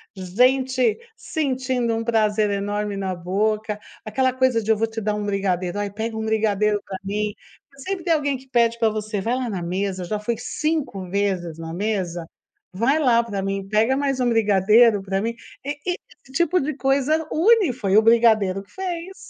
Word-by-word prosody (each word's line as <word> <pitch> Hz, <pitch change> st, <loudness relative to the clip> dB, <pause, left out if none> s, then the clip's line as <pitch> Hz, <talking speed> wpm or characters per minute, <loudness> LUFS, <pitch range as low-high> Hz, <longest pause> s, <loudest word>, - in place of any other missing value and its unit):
gente 250 Hz, +6 st, +2 dB, 0.2 s
sentindo 260 Hz, -, -1 dB
um 225 Hz, -, -2 dB
prazer 215 Hz, -2 st, +2 dB
enorme 205 Hz, 0 st, -2 dB
na 190 Hz, -1 st, -2 dB
boca, 210 Hz, +4 st, -1 dB, 0.3 s
aquela 255 Hz, +4 st, +1 dB
coisa 255 Hz, -3 st, +2 dB
de: 220 Hz, -, +1 dB
"Eu 220 Hz, -, +3 dB
vou 225 Hz, +1 st, +1 dB
te 225 Hz, 0 st, -6 dB
dar 210 Hz, 0 st, -1 dB
1 210 Hz, 0 st, -3 dB
brigadeiro", 190 Hz, -2 st, -1 dB
"ai, 205 Hz, -1 st, -2 dB
pega 220 Hz, +2 st, -4 dB
1 220 Hz, -, -3 dB
brigadeiro 210 Hz, -1 st, +1 dB
para 190 Hz, -, -6 dB
mim", 210 Hz, +1 st, -2 dB, 0.5 s
sempre 370 Hz, +5 st, -4 dB
tem 340 Hz, -, +3 dB
alguém 285 Hz, -3 st, 0 dB
que 260 Hz, +1 st, -18 dB
pede 235 Hz, -2 st, +2 dB
para 225 Hz, -1 st, +3 dB
você: 215 Hz, -1 st, -3 dB
"Vai 235 Hz, +5 st, 0 dB
lá 255 Hz, -2 st, -2 dB
na 190 Hz, -4 st, -3 dB
mesa, 185 Hz, +1 st, -2 dB
já 210 Hz, +4 st, -2 dB
fui 230 Hz, +2 st, -2 dB
5 270 Hz, -, -2 dB
vezes 185 Hz, -4 st, -1 dB
na 165 Hz, 0 st, -6 dB
mesa, 185 Hz, -4 st, -2 dB, 0.5 s
vai 245 Hz, +10 st, +2 dB
lá 235 Hz, -5 st, +4 dB
para 205 Hz, -4 st, -4 dB
mim, 195 Hz, 0 st, -3 dB
pega 220 Hz, +5 st, +2 dB
mais 275 Hz, -2 st, 0 dB
1 250 Hz, -, +2 dB
brigadeiro 215 Hz, 0 st, +4 dB
para 195 Hz, 0 st, -1 dB
mim", 230 Hz, +2 st, -2 dB, 0.3 s
e 285 Hz, -, -1 dB
e 360 Hz, +1 st, -1 dB, 0.3 s
esse 265 Hz, -, -17 dB
tipo 345 Hz, +4 st, +2 dB
de 290 Hz, +1 st, -2 dB
coisa 280 Hz, +3 st, +1 dB
une, 395 Hz, -, +4 dB
foi 205 Hz, -6 st, 0 dB
o -, -, +8 dB
brigadeiro 220 Hz, -4 st, +4 dB
que 200 Hz, -, -26 dB
fez. 370 Hz, 0 st, -5 dB
220 Hz, 190 wpm, -22 LUFS, 200-260 Hz, 0.5 s, o